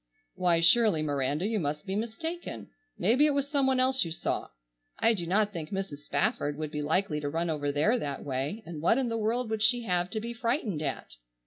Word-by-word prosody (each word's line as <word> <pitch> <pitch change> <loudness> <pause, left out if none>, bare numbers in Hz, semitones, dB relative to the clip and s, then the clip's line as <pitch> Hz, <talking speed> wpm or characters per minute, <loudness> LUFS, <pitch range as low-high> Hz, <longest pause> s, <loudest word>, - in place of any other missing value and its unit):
"Why, 170 -2 +2
surely, 175 -2 +5
Miranda, 145 +3 -1
you 220 0 0
must 150 +1 -3
be 190 0 -3
mistaken. 320 +11 -5 0.3
Maybe 245 - +4
it 290 - +1
was 280 0 0
some 280 -2 +2
one 260 -1 +2
else 260 +1 +3
you 165 - -5
saw. 160 - -2 0.5
I 230 - +4
do 175 -6 -3
not 210 +3 +2
think 155 -4 -5
Mrs. 195 -7 -4
Spafford 150 -2 -1
would 155 -1 -4
be 150 -1 -3
likely 155 +1 0
to 145 -1 -3
run 165 +2 -1
over 145 -2 -1
there 160 - +2
that 140 -8 -4
way, 140 - -3
and 165 -3 -7
what 200 +8 +3
in 260 -3 0
the 230 - -1
world 225 +2 -1
would 220 -1 -1
she 240 +2 +4
have 180 -3 0
to 220 - -2
be 235 +2 -5
frightened 230 - -1
at?" 130 - -4
195 Hz, 220 wpm, -29 LUFS, 155-230 Hz, 0.5 s, surely